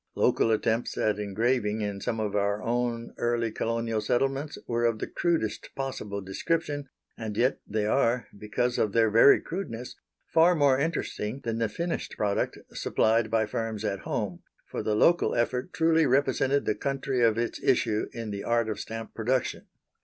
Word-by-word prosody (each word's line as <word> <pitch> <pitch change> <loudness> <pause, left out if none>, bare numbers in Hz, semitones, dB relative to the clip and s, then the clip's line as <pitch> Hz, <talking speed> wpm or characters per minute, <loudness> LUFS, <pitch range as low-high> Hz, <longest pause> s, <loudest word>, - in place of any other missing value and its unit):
Local - - +3
attempts 115 +1 0
at 105 -1 +1
engraving 105 +1 0
in 100 -1 -3
some 115 +2 -2
of 105 -2 -2
our 100 +1 0
own 120 0 -1
early 120 -1 0
colonial 115 0 -1
settlements 135 +6 0
were 120 0 -1
of 115 -2 +2
the - - -3
crudest 165 -11 -1
possible 105 -7 -4
description, 145 - -2 0.3
and 110 -2 -4
yet 125 +3 +2
they 105 0 -1
are, 120 +1 +2
because 115 +4 -1
of 105 -2 +1
their 115 -2 +4
very 115 +6 +7
crudeness, 125 -10 -6 0.3
far 165 +2 +4
more 140 -4 +4
interesting 140 -5 -2
than 115 -1 -2
the 115 -2 +1
finished 170 +10 -3
product 100 -1 0 0.2
supplied 110 0 +1
by 110 0 +2
firms 110 0 -3
at 100 -2 -1
home, 100 -6 -3 0.2
for - - -5
the 105 - 0
local 170 +10 +3
effort 125 +7 0
truly 160 -1 +3
represented 135 +1 +2
the - - +2
country 135 -2 -2
of 115 -2 +4
its 120 0 -2
issue 115 -4 +2
in 115 -2 -5
the 100 0 -4
art 115 -1 +1
of 110 - -3
stamp 115 0 -6
production. 125 +3 -1
115 Hz, 170 wpm, -28 LUFS, 110-130 Hz, 0.3 s, very